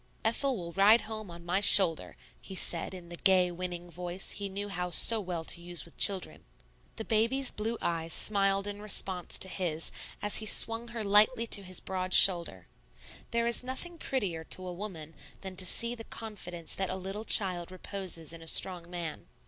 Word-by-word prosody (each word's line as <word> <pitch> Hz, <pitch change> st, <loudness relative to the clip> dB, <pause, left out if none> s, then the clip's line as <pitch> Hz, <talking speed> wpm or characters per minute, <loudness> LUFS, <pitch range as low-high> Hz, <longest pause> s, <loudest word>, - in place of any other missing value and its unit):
"Ethel 255 Hz, +3 st, 0 dB
will 170 Hz, -2 st, -8 dB
ride 205 Hz, +5 st, +4 dB
home 215 Hz, -2 st, -8 dB
on 170 Hz, 0 st, -12 dB
my 175 Hz, +3 st, -1 dB
shoulder," 190 Hz, -5 st, +5 dB, 0.2 s
he 190 Hz, -, -8 dB
said 175 Hz, 0 st, 0 dB
in 175 Hz, -2 st, -12 dB
the 175 Hz, -, -8 dB
gay, 185 Hz, -2 st, +3 dB
winning 175 Hz, 0 st, -5 dB
voice 180 Hz, +2 st, -5 dB
he 200 Hz, -1 st, -5 dB
knew 200 Hz, +2 st, -5 dB
how 180 Hz, -3 st, -5 dB
so 225 Hz, +6 st, +7 dB
well 180 Hz, -4 st, -5 dB
to 170 Hz, -, +2 dB
use 175 Hz, 0 st, -3 dB
with 170 Hz, -, -19 dB
children. 195 Hz, -2 st, 0 dB, 0.5 s
The 220 Hz, -, -7 dB
baby's 235 Hz, +5 st, 0 dB
blue 225 Hz, +2 st, -4 dB
eyes 165 Hz, -1 st, -3 dB
smiled 195 Hz, +1 st, +2 dB
in 205 Hz, 0 st, -5 dB
response 190 Hz, -4 st, -1 dB
to -, -, +2 dB
his 170 Hz, -4 st, -3 dB, 0.3 s
as 205 Hz, -, +3 dB
he 215 Hz, -, +2 dB
swing 225 Hz, +2 st, +2 dB
her 235 Hz, -2 st, -7 dB
lightly 210 Hz, +4 st, +3 dB
to 215 Hz, -3 st, +1 dB
his 185 Hz, -1 st, -5 dB
broad 185 Hz, -1 st, 0 dB
shoulder. 170 Hz, -, +5 dB, 0.6 s
There 235 Hz, 0 st, -1 dB
is 235 Hz, 0 st, 0 dB
nothing 325 Hz, +7 st, -5 dB
prettier 190 Hz, -11 st, -4 dB
to 185 Hz, +2 st, -2 dB
a 180 Hz, -, -6 dB
woman 175 Hz, -5 st, -7 dB, 0.3 s
than 190 Hz, -1 st, -8 dB
to 185 Hz, -, +4 dB
see 235 Hz, +5 st, +5 dB
the 230 Hz, -2 st, -9 dB
confidence 180 Hz, -8 st, -7 dB
that 190 Hz, -1 st, -2 dB
a -, -, -2 dB
little 195 Hz, +3 st, -6 dB
child 185 Hz, -6 st, +1 dB
reposes 185 Hz, -4 st, -5 dB
in 165 Hz, -, -12 dB
a 165 Hz, -, -13 dB
strong 175 Hz, 0 st, 0 dB
man. 170 Hz, -3 st, -7 dB
190 Hz, 190 wpm, -29 LUFS, 175-215 Hz, 0.6 s, so